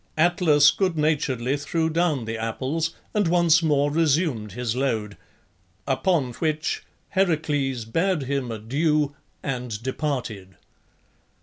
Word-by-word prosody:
Atlas 160 -4 +5
good 185 -4 0
naturedly 140 -4 +1
threw 160 +3 -1
down 160 -6 0
the 115 +1 -3
apples 130 +9 -2 0.2
and 205 -4 +2
once 170 -1 +4
more 145 -2 +2
resumed 150 - +1
his 120 0 -2
load, 110 -6 -1 0.7
upon 140 -2 +1
which 155 +2 -1 0.3
Heracles 150 - 0
bade 165 +6 0
him 135 -1 -2
adieu, 145 +6 0 0.3
and 125 -5 -4
departed. 125 -9 -3
145 Hz, 110 wpm, -24 LUFS, 125-165 Hz, 0.7 s, Atlas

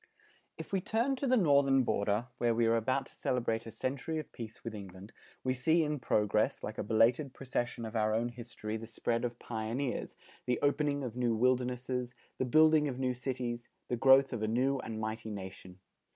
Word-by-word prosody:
If - - -8
we 190 - +2
turn 230 +7 +1
to 275 - -1
the 255 0 +4
Northern 140 - +4
border, 105 0 0
where 120 -1 +2
we 115 0 +3
are 115 0 +4
about 130 +4 0
to - - -17
celebrate 115 -3 -1
a - - -6
century 140 +7 -3
of 155 - -5
peace 115 -1 -9
with 115 - -5
England, 100 0 -9 0.3
we 130 - +1
see 160 +6 +3
in 150 -1 -1
progress, 105 -2 +1
like 105 - -5
a - - 0
belated 115 +6 +2
procession 120 -3 -3
of 110 +1 -7
our 110 -1 +2
own 120 +2 0
history 120 -2 -6
the 110 0 -8
spread 115 +1 -1
of 120 -1 -2
pioneers, 120 +4 -3 0.3
the 125 - +2
opening 145 0 +1
of 120 -3 -5
new 120 -2 +1
wildernesses, 125 +1 0 0.2
the 130 - +1
building 155 +3 +5
of 130 -3 -3
new 130 -1 0
cities, 125 -1 -4 0.2
the 125 - +1
growth 135 +2 +6
of 115 - -3
a 110 - 0
new 130 +5 +1
and 110 -3 -5
mighty 110 0 -4
nation. 95 -2 -8
120 Hz, 195 wpm, -32 LUFS, 110-135 Hz, 0.3 s, growth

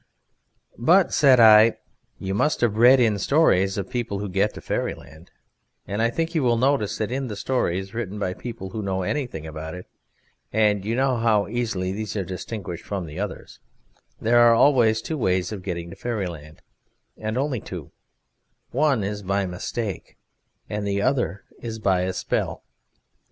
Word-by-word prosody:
"But," 175 +10 +4
said 135 -4 +5
I, 110 0 +7 0.4
"you 95 0 -4
must 150 +10 +1
have 115 -4 +2
read 125 +3 +7
in 110 -4 +2
stories 95 - +3
of 100 +5 -4
people 120 -5 -2
who 100 0 -4
get 100 +3 +1
to - - -7
Fairyland, 80 +3 -5 0.6
and 100 +2 -3
I 115 - +3
think 165 +6 -2
you 160 - +1
will 120 -3 +2
notice 120 -4 +1
that 110 +1 -2
in 135 +1 -2
the 105 - -5
stories 95 -5 -1
written 110 -3 -4
by 95 -3 -2
people 110 -3 -7
who 110 - -4
know 95 -2 -2
anything 120 - -3
about 80 +1 -7
it 90 - -9 0.7
(and 105 -2 +2
you 110 +3 -1
know 130 -1 +1
how 110 -3 +2
easily 110 -5 -2
these 105 +1 -4
are 100 - -1
distinguished 90 -1 -6
from 100 -4 -4
the 75 -1 -8
others) - - -6 0.6
there 120 +2 +3
are 120 -1 +7
always 115 -4 +4
two 155 -2 -4
ways 90 -4 0
of 105 -3 -5
getting 85 -2 -5
to - - -9
Fairyland, 90 -9 -5 0.5
and 110 +2 -4
only 135 -2 -1
two: - - -8 0.8
one 135 -4 +2
is 105 +1 -3
by 100 0 0
mistake, 95 +3 -5 0.5
and 105 -1 -3
the 100 0 0
other 120 -6 0 0.2
is 115 -1 -5
by 95 -4 +1
a 95 0 -1
spell. - - -2
105 Hz, 170 wpm, -24 LUFS, 95-120 Hz, 0.8 s, I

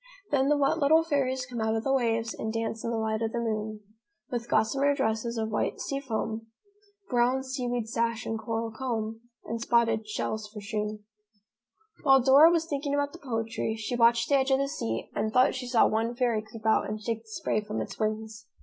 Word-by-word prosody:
Then 275 -1 +3
the 295 - +4
wet 285 +3 +2
little 315 +3 +5
fairies 265 -5 0
come 245 -2 -5
out 220 0 +1
of 225 - -1
the 270 - +1
waves 230 -3 +1
And 220 - -4
dance 225 0 -3
in - - -2
the 230 - -1
light 220 0 -1
of 225 -1 -1
the 235 - -1
moon. 215 -2 -3 0.5
With 240 -1 -3
gossamer 275 +6 +2
dresses 235 -2 -1
of 220 -1 -1
white 210 - -1
sea 275 - -2
foam, 225 -3 -3 0.6
Brown 250 +1 +2
seaweed 245 -3 -2
sash 230 0 -1
and 225 0 -2
coral 225 0 -3
comb, 225 -2 -3 0.2
And 230 0 -4
spottled 230 -2 +2
shells 215 0 -3
for 210 0 -9
shoon." 210 0 -4 1.0
While 270 -3 +6
Dora 280 +5 +8
was 335 -1 +2
thinking 285 -2 -2
about 285 0 0
the 345 - -10
poetry, 225 -3 -2
she 225 +2 -3
watched 235 0 +4
the 280 - +4
edge 265 0 +1
of 265 - +4
the 275 +1 0
sea 115 - -4
and 215 +1 -1
thought 250 +3 +4
she 255 -1 -5
saw 240 -2 +4
one 225 +2 0
fairy 235 -3 +1
creep 215 +1 -12
out 220 -2 +3
and 215 +1 -3
shake 225 +1 -3
the 225 - -21
spray 215 0 -1
from 210 +1 -4
its 195 -2 -6
wings. 220 0 -3
230 Hz, 210 wpm, -28 LUFS, 220-265 Hz, 1.0 s, Dora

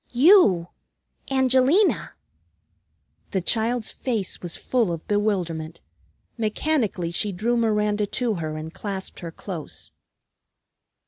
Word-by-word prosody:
"You! 245 - +5 0.6
Angelina!" 265 - +3 1.1
the 190 - 0
child's 225 +5 0
face 225 -7 -2
was 175 -2 -3
full 235 -8 0
of 165 -1 -6
bewilderment. 175 -6 -1 0.6
Mechanically 215 - 0
she 205 +4 0
drew 220 +6 0
Miranda 210 -2 +1
to 240 +2 -1
her 155 -4 -4
and 160 +1 -7
clasped 195 -2 -5
her 170 -2 -6
close. 170 -2 -7
210 Hz, 105 wpm, -24 LUFS, 175-240 Hz, 1.1 s, You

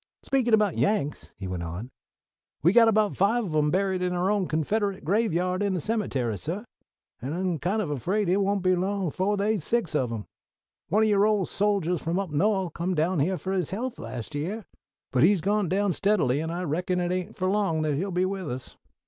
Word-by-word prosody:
Speakin' 245 -4 +3
about 210 -5 +1
Yanks," 200 -9 0
he 95 - -6
went 90 -1 -4
on, 85 +9 -6 0.7
"we've 175 +5 +5
got 220 -3 +4
five 225 +5 +2
of 170 - -5
'em 150 -1 +3
buried 190 +1 0
in 180 0 0
our 180 +2 +1
own 200 -4 +1
Confederate 195 +5 -1
graveyard 185 -1 +1
in 200 -2 +1
the - - -1
cemetery, 140 - -1
suh; 180 - -4 0.6
and 135 +6 -3
I'm 180 -3 -1
kind 205 +7 0
of 155 - -4
afraid 190 - 0
it 180 +3 +3
won't 200 -1 0
be 185 0 +4
long 190 0 -1
befo' 190 +6 0
they's 205 -2 0
six 230 -6 0
of 130 -5 0
'em. 110 -3 -4 0.6
One 215 +2 +3
of 220 - +3
yo' 200 -1 +4
old 210 -3 +2
soldiers 195 -4 0
from 165 +2 -1
up 195 -4 -2
No'th 190 +2 +1
come 180 +2 -2
down 165 +2 +1
here 180 +6 +1
fo' 190 - -4
his 185 -5 0
health 240 +6 -4
last 120 +4 -6
year; 185 +10 -3 0.5
but 125 - +2
he's 195 +4 +5
gone 200 +1 0
down 195 0 +1
steadily, 175 -11 +2
and 160 +1 -3
I 175 +2 -3
reckon 180 +3 -1
it 175 0 -1
ain't 185 -1 -3
for 185 - -1
long 190 -6 +1
that 155 -1 0
he'll 180 +8 -1
be 180 0 +1
with 190 -3 -3
us. 125 +1 -7
185 Hz, 215 wpm, -26 LUFS, 160-205 Hz, 0.7 s, we've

